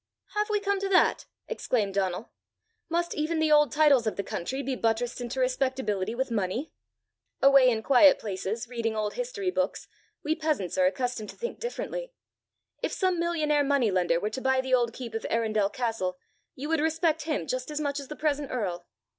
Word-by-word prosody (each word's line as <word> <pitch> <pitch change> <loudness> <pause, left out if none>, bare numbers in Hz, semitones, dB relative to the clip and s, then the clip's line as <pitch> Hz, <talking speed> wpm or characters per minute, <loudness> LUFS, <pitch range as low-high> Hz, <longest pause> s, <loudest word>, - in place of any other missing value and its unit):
"Have 420 +1 0
we 420 -1 +2
come 400 -1 0
to 395 0 -2
that!" 385 - +3 0.2
exclaimed 225 - -1
Donal. 190 +1 -2 0.6
"Must 345 +1 0
even 310 +2 -1
the 315 -1 +2
old 295 -4 +5
titles 285 -6 +4
of 215 - -1
the 200 - -2
country 265 +12 -4
be 270 -1 -2
buttressed 230 +1 -1
into 245 +2 -4
respectability 255 -6 0
with 260 0 -2
money? 225 - -2 0.7
Away 275 -2 +7
in 220 -2 -1
quiet 275 +3 +6
places, 210 +3 -4
reading 230 -2 -2
old 210 -1 -1
history 460 -7 -2
books, 280 -5 -2 0.4
we 310 - +1
peasants 305 - -1
are 185 -1 +4
accustomed 230 +2 -2
to - - -9
think 475 - -5
differently. - - -5 0.7
If - - -2
some 370 -3 +1
millionaire 310 -4 +1
money 275 -6 +2
lender 175 -2 +2
were 210 +4 -2
to 260 - -5
buy 265 0 +2
the 260 0 -1
old 240 -2 +3
keep 235 -1 -8
of 225 - -3
Arundel 215 -3 +1
castle, 220 -6 -2 0.4
you 280 +3 -5
would 320 -1 +1
respect 320 -1 +1
him 305 - -1
just 255 - -3
as 300 0 -3
much 285 -1 -1
as 280 - -8
the 300 - -7
present 295 -2 -1
earl!" 180 -8 -3
260 Hz, 190 wpm, -28 LUFS, 220-310 Hz, 0.7 s, Away